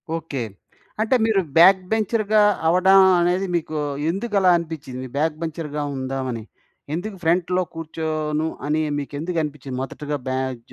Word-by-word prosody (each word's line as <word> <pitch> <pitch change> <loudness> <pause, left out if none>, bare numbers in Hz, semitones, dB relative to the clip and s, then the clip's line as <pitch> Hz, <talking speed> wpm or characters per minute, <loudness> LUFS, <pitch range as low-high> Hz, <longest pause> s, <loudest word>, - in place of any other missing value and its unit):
Okay. 150 -6 -4 0.6
అంటే 225 +4 +2
మీరు 210 -4 +3 0.2
back 190 +2 +7
బెంచర్‌గా 215 -1 +2 0.3
అవ్వడం 190 +3 +6 0.2
అనేది 180 +2 +1
మీకు 155 -2 -2 0.3
ఎందుకు 205 +4 -3
అలా 185 -1 +5
అనిపిచ్చింది? 145 -6 -6
బ్యాక్‌బెంచర్‌గా 155 -1 -2
ఉందామని? 130 -3 -3 0.5
ఎందుకు 195 +4 -5
ఫ్రంట్‌లో 180 +2 +2
కూర్చోను 155 -1 -2 0.2
అని 155 +1 +1 0.2
మీకెందుకు 155 +5 -3
అనిపిచ్చింది 140 -3 -6
మొదటగా 145 +2 -4
బ్యాజ్ 130 -2 -2
160 Hz, 120 wpm, -22 LUFS, 145-185 Hz, 0.6 s, back